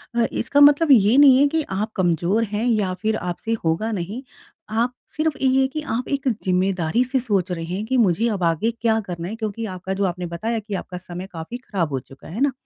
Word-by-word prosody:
अ, 235 -1 +3
इसका 285 - 0
मतलब 290 +2 +6
ये 225 -1 +6
नहीं 275 -3 +8
है 285 - +5
कि 320 +2 0
आप 205 +3 -2
कमज़ोर 180 +4 +1
हैं 215 +1 -2
या 210 -6 +1
फ़िर 220 0 +1
आपसे 180 +4 -3
होगा 165 +8 0
नहीं 205 +4 -4 0.5
आप 230 +3 0 0.2
सिर्फ़ 310 -1 0
ये 265 0 +3
है 265 - +3
कि 305 +3 -5
आप 250 +2 -3
एक 280 -1 -2 0.2
ज़िम्मेदारी 185 +2 +1
से 260 +1 0
सोच 200 -7 -1
रहे 165 -2 -3
हैं 185 +5 -4
कि 260 +3 0
मुझे 220 -1 +3
अब 200 -5 -2
आगे 165 +7 +1
क्या 225 -1 0
करना 175 -4 -6
है? 215 - -5
क्योंकि 220 0 -4
आपका 185 -1 -5
जो 195 +1 -1
आपने 180 -1 -3
बताया 220 +7 -2
कि 210 -1 -8
आपका 185 -1 -6
समय 180 +1 -7
काफ़ी 165 +8 -6
ख़राब 200 -10 -3
हो 130 - 0
चुका 135 +2 -15
है। - - -9
है 235 - -3
ना? 285 0 +3
215 Hz, 230 wpm, -22 LUFS, 180-245 Hz, 0.5 s, नहीं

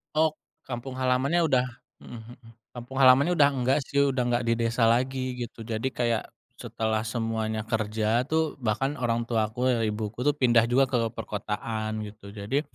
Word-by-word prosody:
Oh, 155 0 +3 0.4
kampung 130 +1 -5
halamannya 130 +6 +1
udah 130 -5 +2 0.3
mhm 120 -2 -10 0.2
mhm. 115 -2 -17 0.3
Kampung 130 +3 -4
halamannya 135 +7 +6
udah 145 -4 +5
nggak 130 +3 +2
sih, 140 0 +3
udah 130 - 0
nggak 120 0 +1
di 115 - +2
desa 115 0 +1
lagi, 130 +2 +1
gitu. 115 -1 -7
Jadi 115 +3 -2
kayak, 120 -3 -1 0.3
setelah 110 -1 -1
semuanya 110 -1 -2
kerja 110 +1 0
tuh, 160 -1 +1
bahkan 125 +5 0
orang 115 -1 0
tua 110 -2 0
aku 125 +3 -3
ya, 120 -2 +1
ibuku 105 +1 -3
tuh 145 +3 +3
pindah 120 -4 +4
juga 135 +2 +4
ke 125 - +1 0.2
perkotaan 110 0 -4
gitu. 105 -1 -11
Jadi, 105 +7 -1
120 Hz, 170 wpm, -27 LUFS, 110-130 Hz, 0.4 s, halamannya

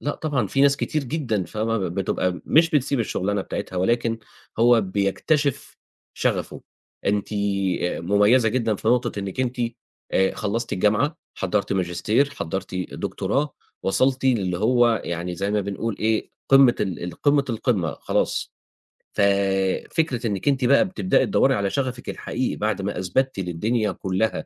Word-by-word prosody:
لأ، 145 - -2
طبعًا 140 -9 -1
في 135 +8 -1
ناس 140 0 +5
كتير 150 0 -2
جدًا 120 - -1
فاهمة 115 +1 -2
ب 90 -3 -3
بتبقى 95 -1 0
م - - -8
مش 165 +2 +4
بتسيب 140 -2 +1
الشُغلانة 100 -2 -1
بتاعتها، 95 -2 -5
ولكن 115 +4 +1 0.4
هو 120 0 +6
بيكتشف 105 - -1 0.4
شغفه. - - -2 0.4
أنتِ 100 +1 0 0.5
آآ 90 - -1
مُميّزة 105 +7 +4
جدًا 115 -2 0
في 110 - -2
نقطة 120 -3 +1
إنِّك 100 +5 -4
أنتِ 125 -1 -2 0.5
آآ 95 0 +2
خلّصتِ 115 +3 -3
الجامعة، 110 - +1 0.2
حضّرتِ 100 +2 -1
ماجستير، 100 +9 +1
حضّرتِ 95 - -5
دكتوراه، 105 +8 -2 0.3
وصلتِ 130 +7 +1
للّي 95 -9 +1
هو 120 +1 +3
يعني 85 +1 -3
زي 100 +3 -2
ما 105 0 +1
بنقول 100 +2 -3
إيه 110 0 0 0.2
قمّة 135 -3 +7
ال 95 -4 -2
ال 90 - -5
قمّة، 145 -1 +4
القمّة 105 - 0
خلاص. - - -1 0.6
ف - - 0 0.7
فكرة 130 -8 0
إنِّك 100 +6 -3
أنتِ 135 -3 +2
بقى 140 +7 +5
بتبدئي 185 0 +1
تدوّري 135 -8 +3
على 100 -1 0
شغفِك 130 -1 -3
الحقيقي - - -3
بعد - - -1
ما - - -3
أثبتِّ 115 +6 0
للدنيا 105 +5 -1
كلّها 95 +4 -1
110 Hz, 150 wpm, -23 LUFS, 95-130 Hz, 0.7 s, قمّة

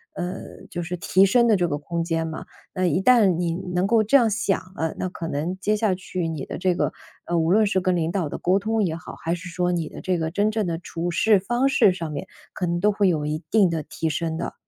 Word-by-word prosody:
呃， 180 +1 -6
就 175 - -4
是 175 +1 -4
提 180 +3 +3
升 235 +5 +4
的 220 - +5
这 175 -1 +1
个 145 - -2
空 170 +3 -3
间 165 -1 -1
嘛。 160 -1 -6 0.3
那 185 -2 0
一 175 +1 +1
旦 240 0 +6
你 170 0 -1 0.2
能 180 +1 +2
够 225 +2 +4
这 215 +6 +1
样 240 -5 +6
想 205 -2 0 0.2
了， 160 0 -2
那 185 - -2
可 170 -2 -6
能 165 +5 -3
接 210 +2 +1
下 210 -2 +1
去 185 -2 -3
你 155 -4 -4
的 - - -6
这 185 0 +1
个， - - -1 0.3
呃， 175 - -1
无 165 +1 +2
论 215 +2 +4
是 190 -2 +1
跟 185 0 +1
领 165 -1 0
导 175 -5 -1
的 - - -5
沟 185 +2 +2
通 220 +2 0
也 165 -4 -1
好， 165 - -9
还 165 +1 -2
是 175 +1 -8
说 180 +1 0
你 165 -3 -2
的 - - -10
这 185 -2 0
个 160 -1 -2
真 205 +4 +1
正 215 -1 -1
的 170 -2 -2
处 170 0 -4
事 210 +4 +4
方 240 +7 +1
式 270 -7 +5
上 165 -4 -5
面， 145 - -5 0.3
可 180 - -2
能 170 0 -1
都 210 +3 +3
会 205 -1 +2
有 155 -5 +1
一 155 +1 -2
定 205 -5 +5
的 165 -2 -2
提 160 +3 -3
升 160 +1 -2
的。 170 - -4
180 Hz, 285 characters per minute, -24 LUFS, 165-200 Hz, 0.3 s, 旦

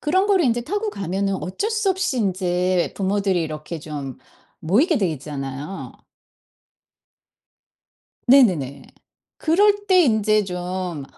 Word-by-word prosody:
그런 375 +6 +2
거를 390 -4 +3
인제 240 -2 +1
타고 415 - -2
가면은 195 - -2
어쩔 295 - -3
수 430 -3 0
없이 370 -9 -1
인제 185 -2 0
부모들이 195 -2 0
이렇게 155 +1 -6
좀 145 -4 -7 0.4
모이게 265 - +2
돼 190 -5 +1
있잖아요. 140 +4 -6 2.4
네네네. 185 - +4 0.5
그럴 410 +5 +2
때 370 -1 +6
인제 215 -4 +2
좀 180 -4 -4
195 Hz, 230 characters per minute, -22 LUFS, -, 2.4 s, 때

